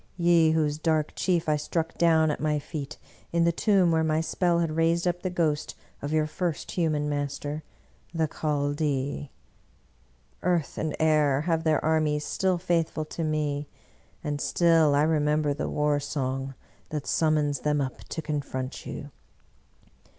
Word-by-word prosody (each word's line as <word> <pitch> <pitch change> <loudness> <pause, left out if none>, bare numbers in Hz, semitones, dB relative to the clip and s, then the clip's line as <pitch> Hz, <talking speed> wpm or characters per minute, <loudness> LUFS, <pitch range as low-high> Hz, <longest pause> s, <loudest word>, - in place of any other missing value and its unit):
— - - -25
^ye 170 -2 +5
whose 150 -1 +1
dark 155 -2 +1
chief 175 -4 0
I 150 -1 +3
struck 165 +2 -2
down 160 -2 +4
at - - -4
my 150 +1 +1
feet 150 0 -6 0.3
in 170 0 +2
the 170 - +4
tomb 185 0 +3
where 160 0 +2
my 155 0 +1
spell 170 +1 +1
had 165 -2 0
raised 165 +2 +2
up 175 0 -1
the 185 - -2
ghost 160 -4 -1 0.3
of 145 - -4
your 155 -1 +2
first 160 0 -3
human 155 -4 0
master, 145 +1 -3 0.5
the 165 -2 0
Chaldee! 145 -2 -1 1.1
Earth 175 -4 0
and 160 -1 -2
air 150 -3 +3
have 165 0 0
their 155 -2 +1
armies 155 -2 +1
still 190 -2 0
faithful 165 -3 0
to 165 - -2
me, 150 -2 -1 0.6
and 145 -2 -2
still 165 -4 +4
I 145 - +4
remember 150 -1 +2
the - - -3
war 150 -1 +1
song 135 -2 -3 0.3
that 150 -2 -4
summons 150 -3 +1
them 150 +1 +1
up 130 -2 -3
to 160 - -5
confront 140 -3 -4
you! 145 -1 -7
155 Hz, 160 wpm, -27 LUFS, 145-165 Hz, 1.1 s, ^ye